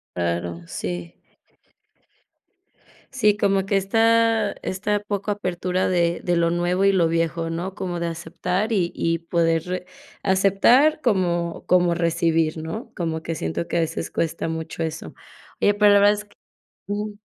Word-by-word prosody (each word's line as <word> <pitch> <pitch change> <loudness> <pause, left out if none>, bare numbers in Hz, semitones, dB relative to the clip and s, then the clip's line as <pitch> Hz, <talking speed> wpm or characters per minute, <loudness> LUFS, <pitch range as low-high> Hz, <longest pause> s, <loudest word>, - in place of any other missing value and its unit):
Claro. 85 -1 -2
Sí. 90 -1 -5 2.0
Sí, 210 -6 +3
como 195 -2 +1
que 200 - +1
esta 225 +2 +3
esta 205 +2 -1
poca 205 0 -3
apertura 185 -2 -1
de 170 -2 +1
de 175 -1 0
lo 170 0 +2
nuevo 175 +3 +1
y 195 - +5
lo 175 -3 +3
viejo, 165 0 -1
¿no? 175 +4 -4
Como 180 -4 -4
de 170 - -1
aceptar 175 +5 -2
y 180 -5 +1
y 165 0 0
poder 170 +2 -1 0.4
aceptar 200 +11 +4
como 175 - 0
como 175 -1 +3
recibir, 165 -1 +1
¿no? 160 +9 -6
Como 160 -2 -3
que 165 0 -3
siento 115 - -3
que - - -2
a - - +3
veces 165 0 -3
cuesta 165 0 -2
mucho 160 0 -4
eso. 160 -1 -5 0.5
Oye, 205 - +4
pues, 205 0 +5
la 200 - +6
verdad 205 +1 +6
es 210 0 -6
que 205 - -25 0.5
Ujú. 205 0 -4
175 Hz, 150 wpm, -23 LUFS, 165-205 Hz, 2.0 s, la